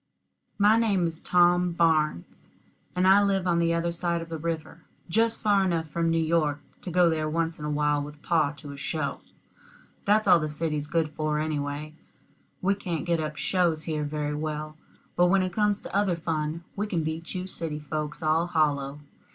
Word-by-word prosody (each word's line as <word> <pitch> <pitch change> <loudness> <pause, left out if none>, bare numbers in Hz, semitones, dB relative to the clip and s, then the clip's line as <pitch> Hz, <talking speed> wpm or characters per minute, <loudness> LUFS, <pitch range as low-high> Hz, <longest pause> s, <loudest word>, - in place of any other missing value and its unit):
My 210 +2 +5
name 205 -6 +2
is 165 -1 -4
Tom 175 0 +3
Barnes, 155 - 0 0.5
and 180 +1 +3
I 195 +2 +7
live 195 -2 +1
on 170 -1 +2
the 170 0 +2
other 170 0 0
side 170 0 -1
of 165 0 -8
the 165 -1 -5
river, 165 0 -4 0.3
just 225 +5 +2
far 205 -2 +4
enough 165 -4 -1
from 165 +1 0
New 165 - +2
York 160 -3 +1 0.2
to - - -6
go 180 0 +4
there 155 -2 0
once 165 +1 -1
in 150 - -5
a - - -2
while 150 0 +1
with 150 +1 -9
pa 160 -4 +2
to 145 -1 -10
a 140 - -9
show. 140 +1 -3 0.8
That's 210 +1 +3
all 180 -2 +7
the 155 -1 -2
city's 150 -1 -2
good 160 -1 0
for, 150 0 -2
anyway. 150 0 -3 0.7
We 195 +2 +3
can't 175 -5 -4
get 170 -2 +1
up 155 -1 -4
shows 170 -4 +1
here 155 -2 -2
very 150 0 -2
well; 155 0 -4 0.4
but 175 0 +4
when 190 +1 +3
it 185 -1 -3
comes 210 0 +1
to - - -7
other 200 -3 +2
fun, 160 0 -3
we 210 +1 -2
can 175 -6 -1
beat 160 +3 -4
you 185 0 -3
city 165 -5 -4
folks 150 +1 -5
all 160 +2 +2
hollow. 145 -4 0
165 Hz, 195 wpm, -27 LUFS, 150-180 Hz, 0.8 s, I